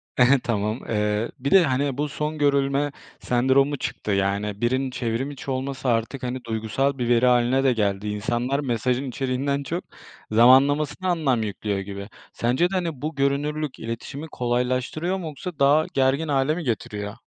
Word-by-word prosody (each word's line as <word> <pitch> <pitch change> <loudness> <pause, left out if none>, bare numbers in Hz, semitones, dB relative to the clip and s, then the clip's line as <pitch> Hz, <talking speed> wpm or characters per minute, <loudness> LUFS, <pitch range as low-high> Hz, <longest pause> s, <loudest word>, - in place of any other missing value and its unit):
He 125 - +5
he, 135 +1 +5
tamam. 110 +1 -1
Eee, 105 +1 0
bir 140 +2 -2
de, 190 -2 +7
hani, 135 -1 0
bu 150 0 -1
son 150 +2 -3
görülme 140 0 +2 0.3
sendromu 135 +3 +2
çıktı. 105 - -4
Yani, 100 +2 -1
birinin 130 +2 0
çevrim 125 +3 -2
içi 135 -1 -6
olması 130 0 -3
artık, 115 +3 -1
hani, 125 0 -3
duygusal 115 +5 -1
bir 120 -1 -1
veri 120 +1 +4
hâline 125 +2 +3
de 130 -2 +4
geldi. 100 -2 -1
İnsanlar 120 +6 -1
mesajın 125 0 -1
içeriğinden 135 +2 -1
çok, 170 +6 -3 0.5
zamanlamasına 140 +9 +4
anlam 135 -10 +1
yüklüyor 100 0 -3
gibi. 100 +1 -7 0.2
Sence 130 +10 +1
de, - - -7
hani, 165 -7 -2
bu 155 0 -3
görünürlük 145 +1 -1
iletişimi 125 +7 -6
kolaylaştırıyor 130 +9 -1
mu? 180 - -6
Yoksa 160 +2 -7
daha 145 +3 +4
gergin 135 +4 +2
hâle 140 +2 +1
mi 175 - -4
getiriyor? 105 -4 -3
130 Hz, 165 wpm, -24 LUFS, 115-145 Hz, 0.5 s, de